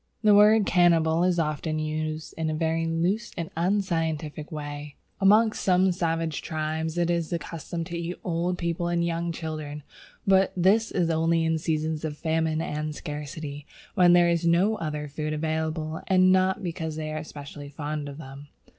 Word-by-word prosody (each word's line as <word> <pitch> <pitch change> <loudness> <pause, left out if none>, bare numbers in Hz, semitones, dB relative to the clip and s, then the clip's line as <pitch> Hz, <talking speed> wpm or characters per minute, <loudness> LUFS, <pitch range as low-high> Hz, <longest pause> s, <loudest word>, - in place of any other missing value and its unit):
The 210 -1 +6
word 210 +1 +6
cannibal 170 -2 +3
is 180 -1 +2
often 155 0 -1
used 155 0 -3
in 160 -1 -2
a 155 - -1
very 165 +1 0
loose 175 +7 0
and 170 -2 -4
unscientific 165 -4 -1
way. 145 -1 -6 0.2
Amongst 215 +3 +4
some 185 0 +3
savage 165 -3 -1
tribes 160 +1 -3
it 175 0 +2
is 170 -2 -1
the 170 - 0
custom 165 +1 -6
to 170 +1 -6
eat 170 +1 -3
old 175 +1 -1
people 170 0 -2
and 170 0 +1
young 170 0 -1
children; 155 -3 -5 0.4
but 190 -1 +4
this 200 +5 +3
is 170 -3 0
only 165 +1 +2
in 160 0 +1
seasons 155 -1 -1
of 150 -2 -4
famine 160 0 0
and 150 -1 -3
scarcity, 150 -1 -6 0.3
when 175 -1 +5
there 175 0 +6
is 170 0 +1
no 175 +6 +3
other 150 -2 -4
food 155 +1 -4
available, 160 0 -2
and 185 -1 +5
not 190 +2 +2
because 165 -3 -4
they 155 0 -4
are 155 0 -3
specially 145 -1 -9
fond 145 0 -4
of 140 - -9
them. 140 -1 -10
165 Hz, 175 wpm, -26 LUFS, 155-175 Hz, 0.4 s, The